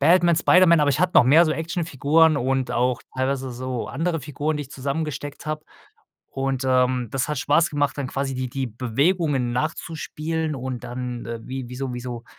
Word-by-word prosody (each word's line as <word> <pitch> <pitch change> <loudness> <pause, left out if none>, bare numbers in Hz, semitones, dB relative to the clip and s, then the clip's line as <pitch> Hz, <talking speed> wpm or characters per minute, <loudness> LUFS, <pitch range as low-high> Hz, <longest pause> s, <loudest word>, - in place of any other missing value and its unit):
Batman, 170 +3 +5
Spider-Man. 170 -1 +5
Aber 145 -1 +3
ich 135 - 0
hatte 180 0 +2
noch - - +7
mehr 155 +7 +6
so 155 - +1
Actionfiguren 160 -1 +2
und 130 0 0
auch 125 +1 +1 0.2
teilweise 130 0 -1
so 125 0 -4
andere 165 +2 -1
Figuren, 150 +2 -2
die - - -2
ich 130 - -17
zusammengesteckt 145 +1 -4
habe. 155 0 -3 0.7
Und, 135 -1 -2
ähm, 125 -1 +2
das 135 +1 -1
hat 150 - -2
Spaß 165 +4 +2
gemacht, 145 -1 0
dann 135 -2 -2
quasi 135 0 -2
die 130 0 -3
die 135 +1 -2
Bewegungen 130 - 0
nachzuspielen 155 +2 -3
und 130 -2 -5
dann, 125 -1 -5
äh, 115 0 -5
wie 130 -2 -5
wie 125 - -7
so 130 -1 -3
wie 125 - -5
so, 120 -1 -6
135 Hz, 190 wpm, -23 LUFS, 125-155 Hz, 0.7 s, noch